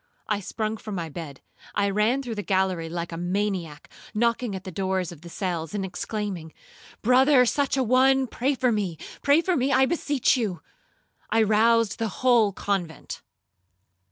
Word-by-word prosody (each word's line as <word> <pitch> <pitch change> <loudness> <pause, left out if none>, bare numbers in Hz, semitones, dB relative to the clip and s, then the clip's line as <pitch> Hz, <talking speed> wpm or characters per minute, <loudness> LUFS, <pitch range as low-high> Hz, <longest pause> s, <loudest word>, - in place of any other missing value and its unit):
I 210 -2 0
sprung 215 +2 -3
from 215 -2 -7
my 170 -3 -4
bed, 145 -3 -8 0.3
I 200 - +2
ran 220 +7 +1
through 240 -3 -4
the 210 - -3
gallery 190 -4 0
like 170 0 -4
a 165 - -5
maniac, 180 -3 -2 0.3
knocking 235 -1 +1
at 190 - -6
the 185 - -7
doors 190 0 -1
of 165 -3 -12
the 170 - -10
cells, 170 -2 -3
and 195 -2 -1
exclaiming, 185 -3 -4 0.5
'Brother 255 +2 +5
such 280 +3 +1
a 265 - +2
one, 260 +2 +4
pray 260 +3 -1
for 250 -1 +1
me,—pray 210 - 0
for 365 +1 0
me, 265 0 +1
I 265 0 +5
beseech 290 -3 +1
you.' 205 -10 -2 0.7
I 225 0 +3
roused 225 +1 +3
the 225 - 0 0.2
whole 235 -5 +5
convent. 185 -5 -3
210 Hz, 165 wpm, -25 LUFS, 180-250 Hz, 0.7 s, Brother